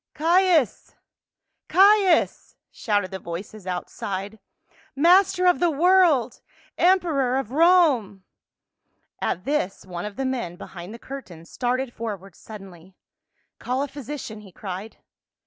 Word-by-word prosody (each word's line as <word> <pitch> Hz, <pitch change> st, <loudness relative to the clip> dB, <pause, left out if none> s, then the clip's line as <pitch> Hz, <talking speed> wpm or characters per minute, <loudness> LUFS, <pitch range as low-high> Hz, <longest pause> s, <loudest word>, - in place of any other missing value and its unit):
" -, -, -67 dB
Caius! 335 Hz, -, +2 dB, 0.7 s
Caius 390 Hz, -2 st, +3 dB
!" -, -, -62 dB
shouted 205 Hz, -4 st, -1 dB
the 190 Hz, -, -5 dB
voices 185 Hz, +4 st, -8 dB
outside. 195 Hz, +3 st, -5 dB, 0.3 s
" -, -, -32 dB
Mas 375 Hz, +2 st, +6 dB
ter 365 Hz, 0 st, -1 dB
of 360 Hz, -1 st, +4 dB
the 350 Hz, -, +3 dB
world! 330 Hz, -6 st, +3 dB, 0.3 s
Emperor 325 Hz, -9 st, +2 dB
of 270 Hz, -4 st, -4 dB
Rome 285 Hz, -, +3 dB, 0.5 s
!" -, -, -47 dB
At 180 Hz, +3 st, -6 dB
this 280 Hz, -12 st, -2 dB
one 175 Hz, -1 st, -6 dB
of 210 Hz, -1 st, -7 dB
the 270 Hz, -, -3 dB
men 240 Hz, -10 st, -3 dB
behind 175 Hz, +1 st, -10 dB
the 230 Hz, -, -9 dB
curtains 190 Hz, -12 st, -10 dB
started 255 Hz, 0 st, -2 dB
forward 200 Hz, -5 st, -7 dB
suddenly. 190 Hz, -4 st, -13 dB, 0.3 s
" -, -, -48 dB
Call 255 Hz, +3 st, -2 dB
a -, -, -3 dB
physician," 275 Hz, -5 st, -8 dB
he 200 Hz, -3 st, -15 dB
cried. 195 Hz, +3 st, -8 dB
245 Hz, 140 wpm, -24 LUFS, 195-325 Hz, 0.7 s, Mas